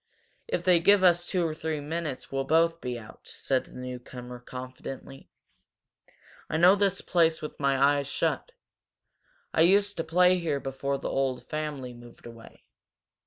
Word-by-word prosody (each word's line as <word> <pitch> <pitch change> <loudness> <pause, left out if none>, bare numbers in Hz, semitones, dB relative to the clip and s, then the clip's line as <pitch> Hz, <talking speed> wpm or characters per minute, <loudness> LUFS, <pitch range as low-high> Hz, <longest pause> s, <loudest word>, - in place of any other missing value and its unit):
"If 175 - -2
they 180 -2 +5
give 200 +3 +5
us 175 -1 +4
two 180 -3 0
or 160 - -1
three 155 -1 -3
minutes 150 -2 -5
we'll 135 0 -1
both 165 +3 +2
get 125 -1 -3
out," 110 -2 -13
said 130 -2 -1
the - - -17
newcomer, 125 -1 -8
confidently. 130 +2 -9 1.2
"I 160 - 0
know 175 +3 +7
this 200 -1 +1
place 165 -2 +2
with 150 - -8
my 140 -1 +2
eyes 140 0 +3
shut. 320 - -1 1.0
I - - +3
used 200 +4 +4
to 165 - -1
play 180 +3 +4
here 155 -5 -1
before 135 +1 -3
the - - -4
old 135 -2 -1
family 150 -5 -4
moved 120 0 -15
away. 115 -1 -13
150 Hz, 160 wpm, -28 LUFS, 130-170 Hz, 1.2 s, know